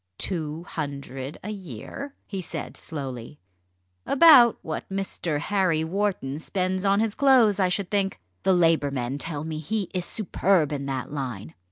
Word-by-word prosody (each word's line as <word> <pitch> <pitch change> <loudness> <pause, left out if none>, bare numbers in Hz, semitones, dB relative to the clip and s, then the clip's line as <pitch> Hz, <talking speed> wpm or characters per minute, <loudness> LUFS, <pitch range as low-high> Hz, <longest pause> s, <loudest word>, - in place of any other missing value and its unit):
"Two 160 -3 -3
hundred 140 -4 -5
a 210 - -4
year?" 195 - -7
he 195 -2 -5
said 170 - -6
slowly; 135 -4 -6 0.7
"about 275 -6 +7
what 160 -2 -5
Mr. 190 -5 -2
Harry 180 -1 +1
Wharton 175 -6 -1
spends 185 +2 -1
on 200 +1 +4
his 220 -1 +1
clothes, 245 -8 +5
I 185 -1 +3
should 185 0 -2
think. 195 - 0 0.2
The 190 - +3
Labour 165 -4 +3
men 135 0 -3
tell 150 -1 -4
me 155 -1 -4
he 195 +5 -3
is 180 -2 -1
superb 185 -5 +1
in 140 -1 -3
that 135 -1 -3
line. 125 - -5
170 Hz, 155 wpm, -25 LUFS, 145-200 Hz, 0.7 s, about